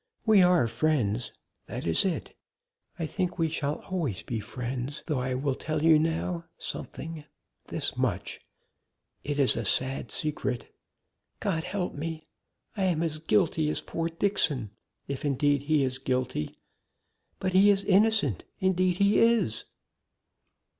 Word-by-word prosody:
"We 215 -4 +6
are 180 -8 +5
friends. 120 -3 0 0.4
That - - -5
is 85 - +2
it. 185 -3 -2 0.6
I 165 - -2
think 180 +2 -2
we 165 -1 +1
shall 150 -1 -2
always 150 - -1
be 115 - -3
friends, 125 +5 -5
though 150 -5 0
I 125 0 -1
will 135 +1 0
tell 155 +3 -3
you 160 -1 +7
now 165 +2 -1
something 160 -1 -6 0.4
this - - -2
much - - -1 0.8
it 145 0 -2
is 140 -3 +4
a 115 - -2
sad 130 +6 0
secret. 140 -5 -2 0.7
God 165 -5 -1
help 185 -2 -2
me! 160 +1 -5 0.5
I 195 -3 +1
am 170 -3 +1
as 155 -2 -2
guilty 160 -2 +2
as - - 0
poor 165 0 -2
Dixon, 155 - 0 0.4
if, 140 -1 -4
indeed, 145 0 +2
he 155 -3 +4
is 130 0 -1
guilty 130 - -2 0.8
but 185 -1 -2
he 195 +2 +7
is 200 -1 +3
innocent 200 - +3 0.2
indeed 185 -1 +2
he 200 +1 +4
is!" 225 - +3
155 Hz, 140 wpm, -28 LUFS, 130-180 Hz, 0.8 s, you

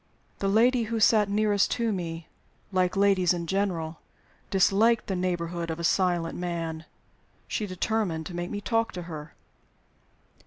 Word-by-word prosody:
The 195 - 0
lady 235 +4 +3
who 225 +1 -2
sat 215 -1 +4
nearest 205 -1 +2
to 230 -2 0
me 165 -3 -4 0.5
(like 185 0 +1
ladies 195 -3 +4
in 170 -1 -3
general) 170 -4 -2 0.5
disliked 215 +4 +3
the 190 - -2
neighborhood 175 -2 -2
of 160 0 -4
a - - -4
silent 175 -2 +1
man. 165 -2 -4 0.6
She 210 - -2
determined 185 -3 -1
to 175 - -7
make 175 +1 -3
me 205 -1 -4
talk 225 +2 0
to 180 - -5
her. 155 -3 -8
185 Hz, 150 wpm, -27 LUFS, 170-210 Hz, 0.6 s, sat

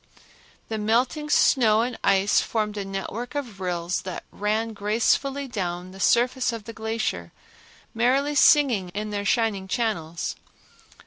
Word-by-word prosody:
The 220 -1 -3
melting 245 +8 0
snow 225 -7 +4
and 240 0 -2
ice 195 +1 +3
formed 210 -2 -2
a 205 - -3
network 195 +7 -5
of 240 -9 -5
rills 175 -1 -2
that 185 -1 -6
ran 220 +2 -1
gracefully 235 +7 0
down 180 -5 -4
the 190 - -12
surface 245 +5 +2
of 230 -2 -6
the 230 - -9
glacier, 220 - -3 0.6
merrily 265 +5 +2
singing 265 - +4
in 210 0 -3
their 205 -1 -3
shining 205 -4 +1
channels. 175 -7 -2
220 Hz, 135 wpm, -25 LUFS, 195-245 Hz, 0.6 s, snow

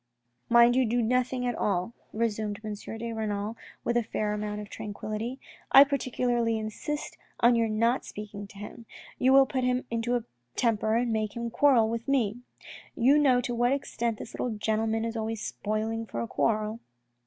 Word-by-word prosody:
" 120 +1 -46
Mind 235 +1 +7
you 260 - +4
do 240 +1 +1
nothing 250 +2 +1
at 245 - 0
all," 195 0 -1 0.2
resumed 215 -2 -1
M. 215 -1 -4
de 225 +3 -6
Renal 215 0 -2 0.3
with 240 - 0
a 240 - +4
fair 215 -1 -2
amount 210 0 -3
of 210 - -7
tranquillity. 215 +4 -5 0.2
" - - -25
I 275 - +10
particularly 245 -4 0
insist 220 +7 -5 0.2
on 235 +1 +6
your 230 -1 +2
not 230 +4 +1
speaking 205 -1 -8
to 195 - -15
him. 210 +3 -9 0.3
You 260 - +4
will 270 0 +7
put 260 -1 -2
him 250 0 +1
into 230 +1 0
a 240 - -1 0.3
temper 220 -2 +1
and 235 0 +1
make 215 0 -1
him 235 0 -3
quarrel 250 -4 +4
with 230 +1 -4
me. 240 -6 +1 0.6
You 270 +5 +5
know 260 -4 +4
to 245 - -3
what 240 +2 +2
extent 235 -5 -2
this - - -9
little 230 -4 -3
gentleman 220 +1 0
is 230 0 -3
always 225 0 -2
spoiling 220 +2 -3
for 115 - -5
a 115 - -3
quarrel." 215 - 0
230 Hz, 190 wpm, -28 LUFS, 215-245 Hz, 0.6 s, I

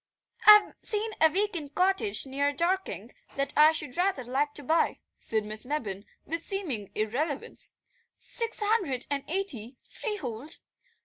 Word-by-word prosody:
"I've 420 -1 +9
seen 435 0 0
a 320 - +8
week 410 +4 0
end 295 -4 -6
cottage 385 +1 +3
near 280 +2 0
Dorking 360 +5 -1 0.2
that 275 0 -1
I 305 +1 +7
should 300 -5 -5
rather 360 -7 +1
like 275 +4 -1
to 290 - -3
buy," 320 +5 +2 0.2
said 220 -2 0
Miss 215 +1 -3
Mebbin 225 -8 -3 0.2
with 330 +1 -3
seeming 290 - -2
irrelevance. 265 +7 -2 0.4
"Six 460 -1 -4
hundred 375 - +1
and 280 -1 -1
eighty, 280 - -2
freehold. 295 - -4
300 Hz, 140 wpm, -28 LUFS, 255-385 Hz, 0.4 s, I've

